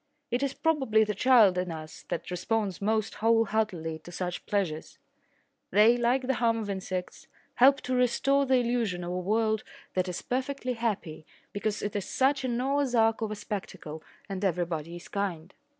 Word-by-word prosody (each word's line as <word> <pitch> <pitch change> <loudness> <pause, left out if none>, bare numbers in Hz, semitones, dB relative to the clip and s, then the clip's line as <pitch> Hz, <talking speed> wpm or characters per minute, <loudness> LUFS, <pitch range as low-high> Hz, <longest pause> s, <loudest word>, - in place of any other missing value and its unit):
It 245 +2 0
is 275 -1 -1
probably 265 -9 +2
the 210 0 -1
child 210 -5 +5
in 180 -1 -2
us 155 -1 -9
that 170 - -4
responds 200 +1 -1
most 215 +1 0
wholeheartedly 215 -8 +1
to 175 - -12
such 180 0 -4
pleasures. 180 -7 -2 0.7
They, 215 +5 +6
like 245 +2 +1
the 265 - +1
hum 230 -1 +3
of 210 -3 -3
insects, 185 -1 -5 0.3
help 270 +3 +6
to 255 - -3
restore 275 +3 +2
the 260 - +4
illusion 235 -7 0
of 175 - -4
a 180 - -2
world 220 +3 +1 0.3
that 185 0 0
is 180 - -5
perfectly 260 0 -2
happy 205 -10 -3 0.3
because 205 +1 -2
it 205 - -3
is 200 -2 -1
such 270 +1 +1
a - - 0
Noah's 260 +2 0
Ark 225 0 +3
of 220 - -1
a 215 - -3
spectacle 190 -7 -6 0.3
and 195 0 -5
everybody 170 -3 -1
is 175 - -10
kind. 185 -3 -3
215 Hz, 175 wpm, -28 LUFS, 180-245 Hz, 0.7 s, They